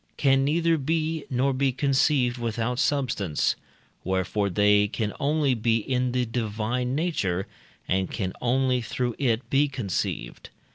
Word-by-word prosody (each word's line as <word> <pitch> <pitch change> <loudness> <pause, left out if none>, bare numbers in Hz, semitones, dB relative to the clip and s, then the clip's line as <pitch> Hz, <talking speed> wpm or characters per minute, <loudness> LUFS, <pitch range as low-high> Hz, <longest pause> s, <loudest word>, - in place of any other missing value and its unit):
can 135 -1 +3
neither 165 +3 +2
be, 160 +2 -1
nor 135 +2 +1
be 135 +1 +1
conceived 130 -2 +2
without 115 +1 -2
substance; 125 - 0 0.5
wherefore 95 +2 0
they 105 +2 +4
can 105 0 -3
only 145 -1 +2
be 115 -1 +1
in 125 +2 -1
the 125 0 0
divine 115 +2 -2
nature, 100 - -1 0.4
and 95 0 0
can 95 -5 -3
only 125 +1 +2
through 120 +1 -2
it 125 -3 0
be 140 +2 +4
conceived. 100 - -4
125 Hz, 135 wpm, -26 LUFS, 110-140 Hz, 0.5 s, they